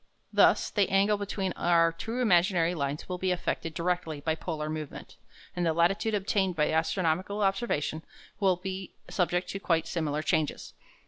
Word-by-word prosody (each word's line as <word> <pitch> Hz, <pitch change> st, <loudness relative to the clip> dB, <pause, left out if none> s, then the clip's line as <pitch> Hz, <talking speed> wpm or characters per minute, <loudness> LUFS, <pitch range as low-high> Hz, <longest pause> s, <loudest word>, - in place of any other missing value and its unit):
Thus -, -, +4 dB
the 205 Hz, -3 st, +2 dB
angle 195 Hz, +2 st, +3 dB
between 195 Hz, -2 st, -2 dB
our 170 Hz, -1 st, +3 dB
two 225 Hz, +9 st, -4 dB
imaginary 175 Hz, -5 st, +3 dB
lines 140 Hz, -2 st, -3 dB
will 180 Hz, -1 st, -4 dB
be 185 Hz, -, 0 dB
affected 165 Hz, -2 st, -2 dB
directly 170 Hz, -3 st, -1 dB
by 160 Hz, +2 st, 0 dB
polar 155 Hz, -2 st, -4 dB
movement, 155 Hz, -2 st, -6 dB, 0.4 s
and 175 Hz, -, -1 dB
the 165 Hz, -1 st, +2 dB
latitude 195 Hz, +6 st, +2 dB
obtained 195 Hz, -2 st, 0 dB
by 150 Hz, -1 st, +1 dB
astronomical 180 Hz, +5 st, 0 dB
observation 195 Hz, -7 st, 0 dB, 0.4 s
will 190 Hz, -3 st, +3 dB
be 190 Hz, +1 st, -6 dB, 0.2 s
subject 180 Hz, -1 st, 0 dB
to 195 Hz, -, -4 dB
quite 165 Hz, -4 st, +1 dB
similar 155 Hz, -3 st, -2 dB
changes. 155 Hz, -2 st, -1 dB
175 Hz, 155 wpm, -29 LUFS, 160-195 Hz, 0.4 s, Thus